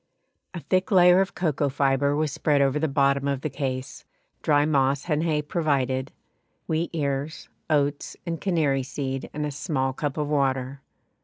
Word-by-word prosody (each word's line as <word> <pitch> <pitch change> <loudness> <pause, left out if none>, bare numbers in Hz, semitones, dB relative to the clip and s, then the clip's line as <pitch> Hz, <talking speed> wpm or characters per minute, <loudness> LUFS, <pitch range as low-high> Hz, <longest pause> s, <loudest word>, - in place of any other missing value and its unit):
A 170 - -5
thick 185 +2 0
layer 180 -1 +6
of 195 - -2
cocoa 150 -5 0
fibre 140 +1 +1
was 155 -1 0
spread 145 -2 +1
over 140 +1 +2
the 160 - +1
bottom 140 -1 +2
of 140 -2 -1
the 155 - -3
case, 135 -2 -4 0.4
dry 145 -1 +3
moss 140 -1 +1
and 155 -2 +1
hay 155 -3 0
provided, 135 -5 -1 0.5
wheat 160 +2 -1
ears, 145 -1 -3 0.2
oats, 145 -1 0
and 165 -2 -4
canary 155 -8 +1
seed, 135 0 -4
and 150 0 -3
a 150 - -3
small 135 -2 -2
cup 145 +1 -3
of 150 -1 -1
water. 135 -2 0
145 Hz, 165 wpm, -25 LUFS, 135-155 Hz, 0.5 s, layer